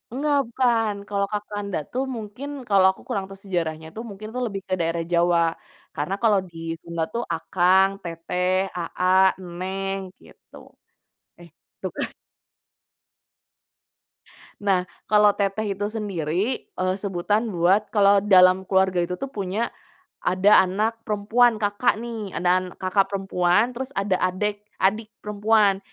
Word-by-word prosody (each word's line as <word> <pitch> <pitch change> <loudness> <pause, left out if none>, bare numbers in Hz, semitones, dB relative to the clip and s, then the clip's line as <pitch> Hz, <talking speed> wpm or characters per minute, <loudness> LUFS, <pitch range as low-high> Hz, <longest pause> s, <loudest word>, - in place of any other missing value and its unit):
Nggak 290 +2 +1
bukan, 230 -3 +1 0.2
kalau 200 -1 0
"kakanda" 205 -1 -3
tuh 260 +2 -1
mungkin 225 +5 -7 0.2
kalau 195 -2 +5
aku - - -16
kurang 195 -1 -2
tahu 195 0 -11
sejarahnya 165 -5 -3
tuh 225 - -5
mungkin 205 +1 -8
tuh 250 - -3
lebih 200 -3 -5
ke 185 - -2
daerah 165 0 -1
Jawa, 170 0 +3 0.5
karena 155 +6 -2
kalau 210 -3 +4
di 170 - -14 0.2
Sunda 170 -1 -3
tuh 235 +1 -1
akang, 185 +3 +3
teteh, 170 +2 -3 0.3
aa, 175 +1 -2 0.5
neng, 195 +1 -3 0.3
gitu. - - -19 0.8
Eh, 175 -1 -14 0.3
tuh - - -2
kan. - - -2 2.5
Nah 185 -3 +1 0.2
kalau 210 -1 +5
teteh 200 0 -1
itu 205 - -2
sendiri, 205 - -2
eee, 185 0 0
sebutan 200 +3 -1
buat 185 +5 +2
kalau 200 -1 +5
dalam 185 -1 +6
keluarga 190 -2 +2
itu 180 - -5
tuh 275 +5 -5
punya, 205 +1 -2 0.5
ada 190 +3 +5
anak 215 +5 -1
perempuan 220 +3 +3
kakak 205 +4 +2
nih, 225 -5 -6
ada 180 +1 +1
kakak 190 +1 +1
perempuan 195 +2 +1
terus 255 +2 -5
ada 195 -2 +1
adik 205 +3 -1 0.2
adik 210 +3 +2
perempuan, 210 -1 +2
195 Hz, 135 wpm, -24 LUFS, 185-210 Hz, 2.5 s, dalam